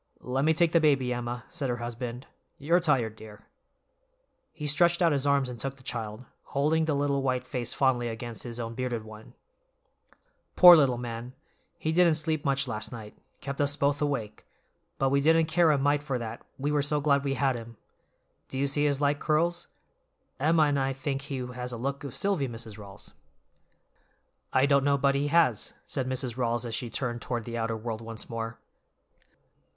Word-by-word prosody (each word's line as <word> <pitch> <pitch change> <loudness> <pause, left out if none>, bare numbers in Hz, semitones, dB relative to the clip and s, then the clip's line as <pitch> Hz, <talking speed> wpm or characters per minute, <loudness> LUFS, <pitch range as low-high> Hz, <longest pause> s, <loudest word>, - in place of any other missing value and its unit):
"Let 130 +3 -1
me 160 0 +3
take 170 0 +3
the 170 - +5
baby, 135 -5 +3
Emma," 120 0 -4
said 145 -6 -3
her 120 - -1
husband, 120 +1 -5 0.3
"you're 165 +5 +2
tired, 130 -10 +1
dear." 105 -1 -13 1.1
He 150 -2 -7
stretched 170 +4 +3
out 170 -3 +4
his 140 -1 0
arms 140 -2 +3
and 125 -2 -7
took 135 +3 -4
the 130 - -18
child, 115 -1 -5 0.2
holding 155 +3 +1
the 155 -2 0
little 140 -1 +1
white 130 -1 -1
face 125 -2 -4
fondly 130 -3 +1
against 115 0 -6
his 120 -1 -7
own 115 -1 -4
bearded 120 -2 -3
one. 110 0 -13 1.2
"Poor 180 -1 +11
little 135 -6 +3
man, 120 +1 -6 0.4
he 155 - -1
didn't 170 -1 +4
sleep 155 -1 -1
much 140 -1 0
last 110 -2 -4
night; 110 -3 -9 0.3
kept 140 0 -3
us 145 0 +1
both 145 0 +1
awake; 135 -8 -2 0.5
but 135 0 +1
we 140 0 +3
didn't 160 +2 +4
care 165 +1 +3
a 150 - +4
mite 145 +1 +2
for 140 -4 -2
that, 115 -1 -6 0.2
we 145 +2 -1
were 150 -1 +2
so 145 +1 0
glad 140 -1 +2
we 135 -1 -1
had 135 -2 +1
him. 115 -1 -9 0.7
Do 130 - -6
you 140 - +1
see 145 +1 +1
his 145 -1 +1
light 145 0 +2
curls? 170 +3 0 0.7
Emma 155 +3 +4
and 145 -2 +2
I 135 0 0
think 135 +1 -3
he 140 -1 -5
has 125 0 -6
a 120 - -5
look 135 +4 -3
of 140 -4 -6
Silvy, 195 -9 0
Mrs. 115 -3 -8
Rawls." 100 0 -11 1.4
"I 130 - +4
don't 140 -1 +3
know 140 0 +3
but 140 0 +2
he 140 +1 0
has," 145 -9 +2
said 130 -2 -3
Mrs. 130 -2 -2
Rawls 120 -1 0
as 115 - -5
she 120 +1 -3
turned 120 -1 -3
toward 120 -3 -3
the 120 - -5
outer 115 0 -1
world 110 0 -5
once 115 -1 -7
more. 115 0 -4
135 Hz, 195 wpm, -28 LUFS, 120-145 Hz, 1.4 s, Poor